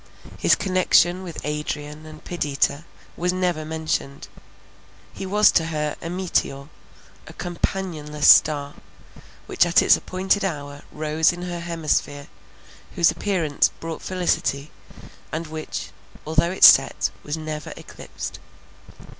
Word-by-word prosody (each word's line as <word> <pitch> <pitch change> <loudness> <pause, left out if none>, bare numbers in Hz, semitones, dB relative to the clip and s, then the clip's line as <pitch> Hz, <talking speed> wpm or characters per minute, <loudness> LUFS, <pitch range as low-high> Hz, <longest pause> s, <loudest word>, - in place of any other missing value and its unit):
His - - +4
connection 185 -1 +2
with 175 -4 -8
Adrian 150 +1 -5
and 155 0 -13
Perdita 150 -2 -1 0.3
was 180 +1 0
never 180 -3 -1
mentioned; 155 -3 -4 0.8
he 195 - -6
was 210 +2 +4
to 165 - +2
her 150 -2 -2
a 165 - -5
meteor, 170 -6 -2 0.6
a - - -11
companionless 170 -4 -3
star, 145 -2 +5 0.7
which - - +2
at 175 0 +4
its - - +6
appointed 190 +2 -1
hour 145 -5 -4
rose 155 +1 +1
in 175 0 -7
her 175 -1 -5
hemisphere, 155 -4 -2 0.7
whose 170 -2 +4
appearance 165 -4 0
brought 165 -1 -6
felicity, 160 -6 -1 0.6
and 160 +2 -3
which, 155 0 -6 0.3
although 160 +2 +1
it 185 - -3
set, - - +7
was 150 +2 -4
never 155 -2 -6
eclipsed. - - -9
160 Hz, 120 wpm, -23 LUFS, 150-175 Hz, 0.8 s, set